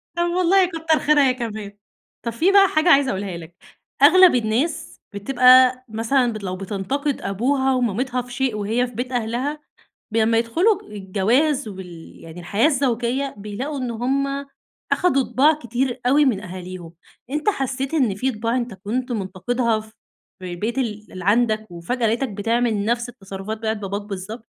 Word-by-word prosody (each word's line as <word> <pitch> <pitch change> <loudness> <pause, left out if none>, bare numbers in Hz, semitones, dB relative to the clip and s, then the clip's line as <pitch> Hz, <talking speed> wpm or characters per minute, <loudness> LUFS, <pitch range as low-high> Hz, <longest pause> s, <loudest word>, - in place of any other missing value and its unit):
طب- 345 - +1
والله- 370 +1 +4
كتر 325 -2 0
خيرها 295 -1 +4
هي - - +2
كمان. 215 -4 -6 0.5
طب 235 - -2
في 325 - +2
بقى 395 0 +7
حاجة 310 0 +2
عايزة 280 -4 +5
أقولها 190 -2 -4
لك. 165 +1 -12 0.5
أغلب 355 +2 +7
الناس، 245 +8 -1
بتبقى 255 +4 +5
مثلًا 230 +3 +1
ب 215 - -5
لو 185 -1 -3
بتنتقد 215 +10 -3
أبوها 265 +6 0
ومامتها 250 +1 -1
في 245 - -13
شيء 260 -2 -1
وهي 225 +4 0
في 245 - -13
بيت 250 +3 -4
أهلها، 245 +5 -2 0.5
ب 220 - -4
لمّا 225 0 +3
يدخلوا 350 - +1
الجواز 225 - 0
وال 180 -4 -10
يعني 165 +2 -10
الحياة 200 - +1
الزوجية، 265 -1 0
بيلاقوا 215 +9 -5
إن 250 -2 -3
هم 275 +4 -1 0.5
أخدوا 275 -7 +3
طباع 285 +5 +3
كتير 245 -2 -3
أوي 290 +4 +5
من 235 -8 +1
أهاليهم. 185 -2 -8 0.4
أنتَ 300 +7 -1
حسّيت 270 -4 -1
إن 255 -10 +2
في 255 +7 -1
طباع 230 +2 -2
أنتَ 240 -4 -3
كنت 240 +6 -3
منتقدها 220 +3 -1
ف 220 0 -15 0.5
في 185 -1 -7
البيت 215 +9 -3
ال 215 -4 -4
اللي 185 -1 -8
عندك، 215 +1 +2
وفجأة 200 +8 -2
لَقيتك 235 +5 0
بتعمل 220 0 0
نفس 235 +2 -1
التصرفات 200 -2 -7
بتاعة 220 0 -1
باباك 200 -1 -4
بالضبط؟ 205 +3 -7
240 Hz, 165 wpm, -22 LUFS, 205-270 Hz, 0.5 s, بقى